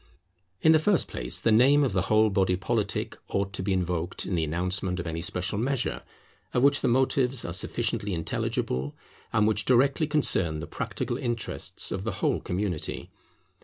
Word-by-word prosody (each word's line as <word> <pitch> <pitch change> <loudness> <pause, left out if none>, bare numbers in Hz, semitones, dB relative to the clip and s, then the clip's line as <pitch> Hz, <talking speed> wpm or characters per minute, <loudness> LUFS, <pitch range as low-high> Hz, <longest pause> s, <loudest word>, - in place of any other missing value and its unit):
In 160 - +7
the 160 - +6
first 190 +3 +2
place - - -2
the 115 - +2
name 135 +6 +5
of 135 - +1
the - - +2
whole 110 0 +4
body 95 -2 +2
politic 105 +2 -2
ought 100 0 -2
to - - -2
be 95 +2 -1
invoked 90 -1 -1
in - - -3
the 85 -2 +1
announcement 90 +3 -1
of 85 - -4
any 85 0 -3
special 90 +4 -2
measure, 130 +1 -1 0.5
of 125 - +3
which 140 +1 +4
the - - +1
motives 130 0 +2
are - - -4
sufficiently 100 -3 -2
intelligible, 70 -4 -2 0.4
and 105 - +3
which 105 0 +2
directly 135 +5 +3
concern 95 - +1
the 80 - -5
practical - - -4
interests 120 -2 -2
of - - -3
the - - -2
whole - - 0
community. 90 -3 -3
105 Hz, 175 wpm, -27 LUFS, 90-125 Hz, 0.5 s, In